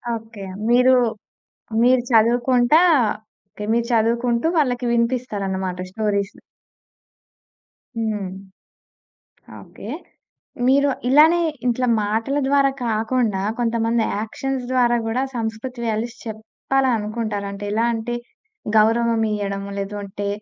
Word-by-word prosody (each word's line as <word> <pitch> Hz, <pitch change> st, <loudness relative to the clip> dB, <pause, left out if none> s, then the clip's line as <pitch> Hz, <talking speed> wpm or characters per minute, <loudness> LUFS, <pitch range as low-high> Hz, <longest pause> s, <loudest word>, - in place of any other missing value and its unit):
Okay. 225 Hz, -2 st, -9 dB, 0.3 s
మీరు, 250 Hz, +2 st, +5 dB, 0.9 s
మీరు 250 Hz, +1 st, +5 dB
చదువుకుంటా 240 Hz, +5 st, +4 dB, 0.7 s
ఓకే. 210 Hz, +2 st, -8 dB
మీరు 235 Hz, 0 st, 0 dB
చదువుకుంటూ 235 Hz, +2 st, +1 dB
వాళ్ళకి 250 Hz, -4 st, +1 dB
వినిపిస్తారనమాట 200 Hz, -7 st, -1 dB
స్టోరీసు. 200 Hz, -1 st, -2 dB, 1.6 s
హ్మ్. 215 Hz, -3 st, -2 dB, 1.3 s
ఓకే. -, -, -12 dB, 0.8 s
మీరు 280 Hz, +2 st, +4 dB, 0.2 s
ఇలానే 310 Hz, +6 st, +6 dB, 0.3 s
ఇట్లా 250 Hz, +1 st, +1 dB, 0.2 s
మాటల 225 Hz, +7 st, -1 dB
ద్వారా 275 Hz, 0 st, +4 dB, 0.2 s
కాకుండా 220 Hz, -2 st, 0 dB, 0.2 s
కొంతమంది 230 Hz, -1 st, +1 dB, 0.2 s
యాక్షన్స్ 255 Hz, +4 st, -3 dB
ద్వారా 240 Hz, -2 st, +3 dB
గూడా 235 Hz, +4 st, 0 dB
సంస్కృతి 230 Hz, +2 st, -4 dB
వాల్యూస్ 225 Hz, +2 st, -2 dB
చెప్పాలనుకుంటారు. 220 Hz, -2 st, -2 dB
అంటే 200 Hz, +1 st, -7 dB
ఎలా 225 Hz, +2 st, +1 dB
అంటే, 230 Hz, +2 st, -3 dB, 0.6 s
గౌరవం 230 Hz, +1 st, +3 dB
ఇయడము 200 Hz, -1 st, -4 dB
లేదు 200 Hz, +1 st, -4 dB
అంటే, 200 Hz, +1 st, -5 dB
230 Hz, 95 wpm, -21 LUFS, 215-250 Hz, 1.6 s, ఇలానే